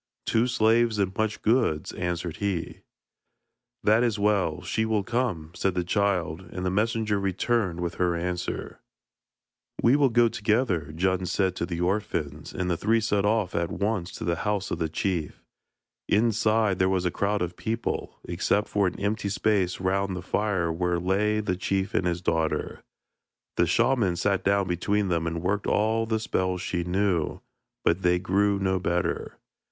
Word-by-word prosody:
'Two 115 Hz, +2 st, +2 dB
slaves 115 Hz, -1 st, +3 dB
and 95 Hz, -2 st, 0 dB
much 110 Hz, -1 st, -1 dB
goods,' 110 Hz, -, +2 dB
answered 85 Hz, -1 st, -3 dB
he. 100 Hz, -5 st, -2 dB, 1.0 s
'That 110 Hz, +2 st, +4 dB
is 115 Hz, -3 st, +1 dB
well; 100 Hz, -6 st, +1 dB
she 110 Hz, -, 0 dB
will 110 Hz, -2 st, 0 dB
come,' 105 Hz, -9 st, -2 dB
said 95 Hz, 0 st, -1 dB
the 90 Hz, -, 0 dB
child, 90 Hz, -3 st, 0 dB
and 90 Hz, 0 st, -4 dB
the 90 Hz, -, +1 dB
messenger 110 Hz, 0 st, +1 dB
returned 95 Hz, -1 st, 0 dB
with 85 Hz, 0 st, -2 dB
her 90 Hz, -1 st, +2 dB
answer. 90 Hz, +1 st, -4 dB, 1.0 s
'We 120 Hz, +4 st, +6 dB
will 140 Hz, -2 st, +4 dB
go 120 Hz, 0 st, +4 dB
together,' 105 Hz, -, 0 dB
Djun 95 Hz, +3 st, 0 dB
said 95 Hz, -1 st, 0 dB
to 85 Hz, -, -2 dB
the 85 Hz, -1 st, -3 dB
orphans, 85 Hz, -6 st, -2 dB
and 90 Hz, -, -3 dB
the 85 Hz, -2 st, 0 dB
three 115 Hz, +5 st, +2 dB
set 105 Hz, -2 st, +1 dB
off 105 Hz, -3 st, +1 dB
at 85 Hz, -1 st, 0 dB
once 100 Hz, -4 st, -2 dB
to -, -, -6 dB
the 85 Hz, 0 st, 0 dB
house 105 Hz, -1 st, -2 dB
of 85 Hz, -, -2 dB
the 80 Hz, -1 st, -1 dB
chief. 85 Hz, -1 st, -2 dB, 0.7 s
Inside, 110 Hz, -2 st, +2 dB
there 95 Hz, 0 st, +3 dB
was 95 Hz, -1 st, 0 dB
a 90 Hz, -, +1 dB
crowd 100 Hz, +1 st, 0 dB
of 90 Hz, 0 st, -4 dB
people, 115 Hz, +4 st, -3 dB
except 95 Hz, +4 st, 0 dB
for 100 Hz, -2 st, +2 dB
an -, -, -4 dB
empty 100 Hz, 0 st, -1 dB
space 100 Hz, -3 st, +1 dB
round 95 Hz, 0 st, 0 dB
the 90 Hz, -, -6 dB
fire 95 Hz, -4 st, 0 dB
where 90 Hz, +1 st, 0 dB
lay 100 Hz, +4 st, +1 dB
the 95 Hz, -3 st, -1 dB
chief 95 Hz, +1 st, -1 dB
and 90 Hz, -, +1 dB
his 85 Hz, 0 st, -1 dB
daughter. 80 Hz, -2 st, -1 dB, 0.7 s
The 85 Hz, -, +3 dB
shaman 115 Hz, -1 st, +2 dB
sat 95 Hz, +2 st, 0 dB
down 100 Hz, -1 st, +2 dB
between 100 Hz, +3 st, 0 dB
them 85 Hz, -1 st, 0 dB
and 85 Hz, 0 st, -3 dB
worked 100 Hz, +2 st, 0 dB
all 110 Hz, +2 st, +1 dB
the 110 Hz, -1 st, 0 dB
spells 95 Hz, -4 st, -1 dB
she 90 Hz, -2 st, -2 dB
knew, 90 Hz, -2 st, 0 dB, 0.5 s
but 85 Hz, +3 st, +2 dB
they 90 Hz, -1 st, +3 dB
grew 100 Hz, +3 st, +1 dB
no 95 Hz, -1 st, 0 dB
better. 85 Hz, 0 st, -2 dB
95 Hz, 170 wpm, -26 LUFS, 90-105 Hz, 1.0 s, We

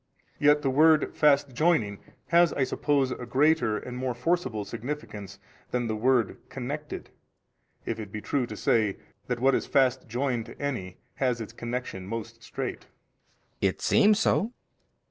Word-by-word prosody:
Yet 150 Hz, 0 st, +4 dB
the 135 Hz, -, +2 dB
word 155 Hz, +2 st, +4 dB
fast 145 Hz, -2 st, +3 dB
joining 120 Hz, -, +2 dB, 0.3 s
has 170 Hz, 0 st, +5 dB
I 140 Hz, -, +1 dB
suppose 135 Hz, 0 st, +1 dB
a 125 Hz, -, -5 dB
greater 135 Hz, -3 st, +3 dB
and 125 Hz, +2 st, -7 dB
more 125 Hz, -1 st, -2 dB
forcible 125 Hz, -, -1 dB
significance 110 Hz, -8 st, -6 dB, 0.3 s
than 125 Hz, -1 st, -1 dB
the 110 Hz, -1 st, -1 dB
word 120 Hz, +1 st, +2 dB
connected, 145 Hz, +3 st, -6 dB, 0.7 s
if -, -, -3 dB
it 105 Hz, -3 st, -7 dB
be 105 Hz, -, -4 dB
true 125 Hz, +3 st, -1 dB
to 105 Hz, -, -7 dB
say 110 Hz, -3 st, +2 dB, 0.3 s
that 125 Hz, -1 st, -2 dB
what 135 Hz, +2 st, +4 dB
is -, -, 0 dB
fast 130 Hz, -2 st, +2 dB
joined 120 Hz, 0 st, -1 dB
to -, -, -12 dB
any 120 Hz, -11 st, -3 dB, 0.2 s
has 125 Hz, -3 st, +1 dB
its 110 Hz, -, -7 dB
connection 120 Hz, -6 st, -5 dB
most 115 Hz, +1 st, -6 dB
strait. -, -, -5 dB, 0.7 s
B. -, -, +3 dB
It -, -, -3 dB
seems 210 Hz, 0 st, +4 dB
so. 220 Hz, +2 st, +1 dB
130 Hz, 160 wpm, -27 LUFS, 115-145 Hz, 0.7 s, has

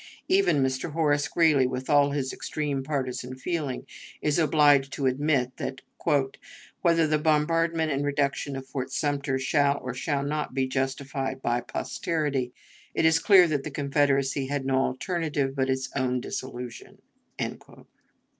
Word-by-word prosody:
Even 375 Hz, -, +3 dB
Mr. 130 Hz, +4 st, -2 dB
Horace 145 Hz, -3 st, +2 dB
Greeley, 155 Hz, -6 st, +3 dB
with 130 Hz, 0 st, -4 dB
all 145 Hz, -1 st, +4 dB
his 140 Hz, -2 st, -2 dB
extreme 145 Hz, -3 st, -3 dB
partisan 130 Hz, -3 st, -3 dB
feeling, 145 Hz, -2 st, -3 dB, 0.3 s
is 150 Hz, +2 st, +1 dB
obliged 145 Hz, -3 st, +4 dB
to 140 Hz, -, -2 dB
admit 130 Hz, -1 st, +1 dB
that, 130 Hz, -, -5 dB, 1.0 s
"whether 165 Hz, -2 st, +4 dB
the 155 Hz, 0 st, +1 dB
bombardment 160 Hz, +1 st, +2 dB
and 140 Hz, +1 st, 0 dB
reduction 140 Hz, -1 st, -1 dB
of 135 Hz, 0 st, -6 dB
Fort 130 Hz, -1 st, -5 dB
Sumter 140 Hz, -1 st, -1 dB
shall 140 Hz, +1 st, +2 dB
or 125 Hz, -1 st, -5 dB
shall 140 Hz, +2 st, -1 dB
not 150 Hz, +1 st, -3 dB
be 135 Hz, -1 st, +2 dB
justified 135 Hz, 0 st, -2 dB
by 120 Hz, 0 st, +1 dB
posterity, 140 Hz, -1 st, -2 dB, 0.4 s
it -, -, +2 dB
is 160 Hz, 0 st, +5 dB
clear 185 Hz, -1 st, +7 dB
that 145 Hz, -4 st, -1 dB
the -, -, -4 dB
Confederacy 140 Hz, -1 st, +1 dB
had 140 Hz, -1 st, -2 dB
no 135 Hz, -1 st, +1 dB
alternative 145 Hz, -1 st, -2 dB
but 130 Hz, -1 st, 0 dB
its 130 Hz, 0 st, 0 dB
own 130 Hz, -2 st, 0 dB
dissolution." 120 Hz, -1 st, -7 dB
140 Hz, 145 wpm, -27 LUFS, 130-150 Hz, 1.0 s, clear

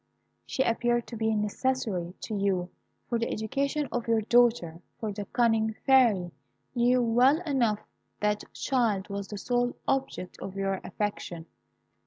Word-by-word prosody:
She 265 Hz, -, +1 dB
appeared 240 Hz, 0 st, +1 dB
to 235 Hz, -, -8 dB
be 220 Hz, 0 st, +1 dB
necessary 210 Hz, -4 st, -1 dB
to 220 Hz, -, -5 dB
you 190 Hz, -3 st, 0 dB, 0.4 s
for 235 Hz, -, 0 dB
the 230 Hz, -, -1 dB
education 275 Hz, +6 st, -1 dB
of 240 Hz, -1 st, -2 dB
your 225 Hz, -1 st, +3 dB
daughter, 225 Hz, -8 st, +3 dB, 0.2 s
for 220 Hz, -2 st, -2 dB
the 205 Hz, 0 st, -5 dB
cunning 225 Hz, -1 st, +2 dB
Fairy 230 Hz, -10 st, +4 dB, 0.4 s
knew 245 Hz, 0 st, +3 dB
well 250 Hz, +6 st, +4 dB
enough 245 Hz, -, +1 dB, 0.4 s
that 210 Hz, 0 st, -1 dB
child 220 Hz, -7 st, 0 dB
was 200 Hz, 0 st, -4 dB
the 210 Hz, -, -6 dB
sole 245 Hz, +3 st, 0 dB
object 270 Hz, -9 st, -2 dB
of 195 Hz, -, -6 dB
your 195 Hz, -1 st, -1 dB
affection. 180 Hz, -4 st, -4 dB
225 Hz, 145 wpm, -28 LUFS, 200-245 Hz, 0.4 s, Fairy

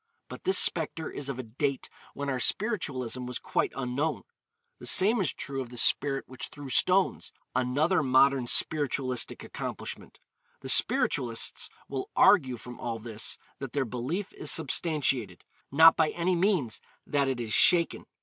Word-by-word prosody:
But -, -, -10 dB
this 380 Hz, -, +3 dB
spectre 160 Hz, -2 st, +1 dB
is 140 Hz, -1 st, -5 dB
of 135 Hz, -, -4 dB
a 130 Hz, -, -5 dB
date 135 Hz, +4 st, -3 dB, 0.3 s
when 140 Hz, 0 st, -4 dB
our 130 Hz, -2 st, -1 dB
spiritualism 130 Hz, -, -1 dB
was 125 Hz, -, -3 dB
quite -, -, -1 dB
unknown. 135 Hz, +4 st, -2 dB, 0.6 s
The -, -, -7 dB
same 215 Hz, +4 st, +4 dB
is 165 Hz, -, 0 dB
true 135 Hz, -1 st, -5 dB
of 125 Hz, -, -7 dB
the 125 Hz, -, -10 dB
spirit 135 Hz, +3 st, +1 dB
which 130 Hz, -1 st, -6 dB
threw 145 Hz, -2 st, -10 dB
stones, 185 Hz, +9 st, +2 dB, 0.2 s
another 145 Hz, +9 st, +1 dB
modern 130 Hz, -1 st, +3 dB
spiritualistic 135 Hz, -3 st, 0 dB
accomplishment. -, -, -7 dB, 0.4 s
The -, -, -6 dB
spiritualists 115 Hz, -2 st, +1 dB, 0.2 s
will 135 Hz, -1 st, -5 dB
argue 135 Hz, -11 st, +4 dB
from 125 Hz, +1 st, -11 dB
all 115 Hz, -1 st, -4 dB
this 110 Hz, -1 st, -3 dB, 0.2 s
that 135 Hz, -3 st, -7 dB
their 140 Hz, -2 st, 0 dB
belief 130 Hz, -, -4 dB
is -, -, -4 dB
substantiated, 140 Hz, -, +1 dB, 0.3 s
not 160 Hz, +3 st, +7 dB
by 160 Hz, -2 st, +2 dB
any 180 Hz, +1 st, -1 dB
means 170 Hz, -, 0 dB, 0.2 s
that 140 Hz, -1 st, 0 dB
it 130 Hz, -2 st, -2 dB
is 110 Hz, -3 st, -4 dB
shaken. 170 Hz, -2 st, +3 dB
135 Hz, 155 wpm, -28 LUFS, 125-160 Hz, 0.6 s, not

